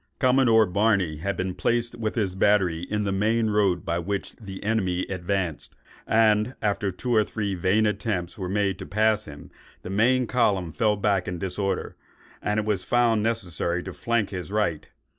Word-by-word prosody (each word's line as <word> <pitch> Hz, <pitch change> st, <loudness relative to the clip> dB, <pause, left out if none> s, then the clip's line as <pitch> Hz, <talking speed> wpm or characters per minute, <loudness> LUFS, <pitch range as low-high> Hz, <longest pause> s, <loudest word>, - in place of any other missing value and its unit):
Commodore 125 Hz, -4 st, +4 dB
Barney 100 Hz, -4 st, +1 dB
had 100 Hz, +6 st, -3 dB
been 95 Hz, 0 st, -2 dB
placed 120 Hz, +4 st, 0 dB
with 115 Hz, -2 st, -3 dB
his 100 Hz, -6 st, 0 dB
battery 95 Hz, -4 st, +2 dB
in 105 Hz, 0 st, -1 dB
the 100 Hz, -, -1 dB
main 110 Hz, +3 st, +1 dB
road 100 Hz, -4 st, +1 dB
by 85 Hz, +1 st, -1 dB
which 100 Hz, +3 st, -4 dB
the 95 Hz, -4 st, -9 dB
enemy 95 Hz, -5 st, 0 dB
advanced; 90 Hz, -3 st, -3 dB, 0.3 s
and 110 Hz, +2 st, +3 dB
after 105 Hz, -1 st, 0 dB
two 120 Hz, +7 st, -3 dB
or 110 Hz, -2 st, +5 dB
three 105 Hz, -2 st, -3 dB
vain 95 Hz, +4 st, +2 dB
attempts 100 Hz, -4 st, -2 dB
were 95 Hz, -3 st, -5 dB
made 100 Hz, -1 st, 0 dB
to -, -, -7 dB
pass 110 Hz, 0 st, +1 dB
him, 75 Hz, -1 st, -11 dB, 0.3 s
the 90 Hz, -, -6 dB
main 125 Hz, +5 st, +3 dB
column 105 Hz, -8 st, +1 dB
fell 105 Hz, +5 st, +1 dB
back 100 Hz, -3 st, +1 dB
in 90 Hz, -, -3 dB
disorder, 95 Hz, +2 st, -2 dB, 0.5 s
and 105 Hz, +1 st, 0 dB
it 105 Hz, -, -2 dB
was 105 Hz, -4 st, -1 dB
found 120 Hz, -2 st, +2 dB
necessary 90 Hz, -6 st, -1 dB
to 95 Hz, -, -7 dB
flank 115 Hz, -1 st, -1 dB
his 90 Hz, 0 st, -6 dB
right. 100 Hz, -8 st, -1 dB
100 Hz, 180 wpm, -25 LUFS, 95-110 Hz, 0.5 s, or